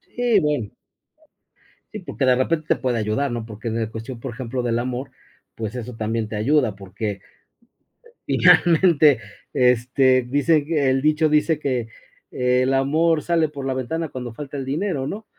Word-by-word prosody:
Sí, 240 -4 +3
bueno. 150 -9 -1 1.2
Sí, 215 - -5
porque 160 -6 -3
de 130 -1 +5
repente 155 +4 -1
te - - +3
puede 125 -3 -1
ayudar, 110 +6 -1
¿no?, 120 -2 -4
porque 110 +1 -6
en 115 0 -2
cuestión, 115 +2 -8
por 130 +1 -6
ejemplo, 125 0 -4
del 120 -1 0
amor, 125 +2 -3 0.5
pues, 110 -1 -5
eso 125 -1 -6
también 110 0 -2
te 110 - -6
ayuda, 120 0 +1
porque 100 +1 -5 1.1
finalmente, 165 -5 +5 0.3
este, 130 +1 +3
dicen 145 +4 +1
que 150 -4 0
el 135 0 +1
dicho 155 +2 +2
dice 150 +1 +2
que: 125 -6 -2 0.4
"El 125 +1 +1
amor 155 +4 +2
sale 165 -3 +1
por 140 -2 -7
la 135 - -1
ventana 150 +5 -3
cuando 125 -3 -7
falta 145 +2 -7
el 135 - -4
dinero", 145 -1 -2
¿no?, 215 +6 -6
130 Hz, 165 wpm, -22 LUFS, 120-150 Hz, 1.2 s, de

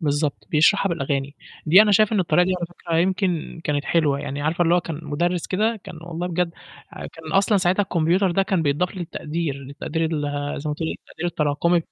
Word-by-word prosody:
بالضبط 145 -2 -1
بيشرحها 195 +6 +4
بالأغاني، 140 -4 -2 0.3
دي 185 +7 +8
أنا 210 -1 +3
شايف 215 +2 +4
إن 205 - +3
الطريقة 175 0 +3
دي 185 - 0
على 175 - -4
فكرة 170 -1 -4
يمكن 180 -2 0
كانت 145 -1 -1
حلوة، 150 -4 +2
يعني 145 0 -4
عارفة 170 +3 +1
اللي 170 - +4
هو 175 - +3
كان 165 -3 -6
مدرِّس 170 +4 -1
كده 215 +3 0
كان 165 - -9
والله 170 +1 -4
بجد 180 0 0 0.4
كان 160 -1 -9
أصلًا 200 +2 +3
ساعتها 185 +2 +2
الكمبيوتر 180 +1 +1
ده 195 +3 +2
كان 190 -3 0
بيتضاف 160 +6 0
للتقدير، 165 -3 -3
للتقدير 140 +4 -4
ال 160 -2 -1 0.4
زي 150 - -4
ما 150 - -1
تقولي 160 +1 -3
التقدير 175 - -7
التراكمي 160 +2 +1
170 Hz, 195 wpm, -23 LUFS, 150-180 Hz, 0.4 s, دي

